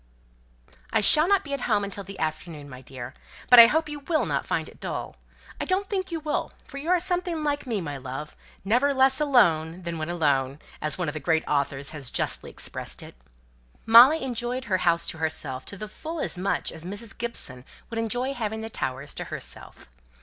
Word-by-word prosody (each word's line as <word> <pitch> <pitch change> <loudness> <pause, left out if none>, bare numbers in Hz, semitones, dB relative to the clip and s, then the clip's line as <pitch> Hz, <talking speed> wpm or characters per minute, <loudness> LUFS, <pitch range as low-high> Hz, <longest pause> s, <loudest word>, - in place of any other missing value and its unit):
"I 220 - +3
shall 305 +10 +6
not 400 -1 +3
be 280 - -6
at 280 - -2
home 210 -2 +3
until 200 0 -5
the 195 +1 -10
afternoon, 155 -1 -4
my 130 -2 -10
dear! 130 -1 -9 0.4
But 245 - +11
I 230 - +12
hope 315 +5 +1
you 295 -1 -6
will 310 +3 0
not - - -2
find - - -1
it - - -15
dull. - - -5 0.4
I - - -2
don't 385 +2 -1
think 375 -2 -2
you 330 - -2
will, 305 -1 -2
for 275 - -8
you 310 +4 -5
are 365 0 +4
something 355 -2 -1
like 290 -2 -1
me, 220 -5 -1
my 145 -4 -5
love 135 +3 -7 0.3
never 255 +7 +2
less 265 +2 +4
alone 180 - +3
than 170 -1 -4
when 155 +1 -3
alone, 140 -5 +1 0.2
as 155 0 -1
one 180 -2 -2
of 150 - -2
the 155 - -4
great 160 +2 +1
authors 140 -1 -1
has 140 -5 -5
justly - - 0
expressed - - -5
it." - - -11 0.7
Molly 245 +8 +8
enjoyed 245 0 -2
the 190 -6 0
house 170 -1 +2
to 160 - -3
herself 155 -5 -3
fully 215 - -5
as - - -4
much 185 +2 -1
as 160 - -9
Mrs. 205 +4 -4
Gibson 140 - -2 0.3
would 225 - -2
enjoy 245 +4 -1
having 220 -3 -3
the 225 0 -6
Towers 135 -2 -3
to - - -5
herself. - - -9
210 Hz, 200 wpm, -26 LUFS, -, 0.7 s, I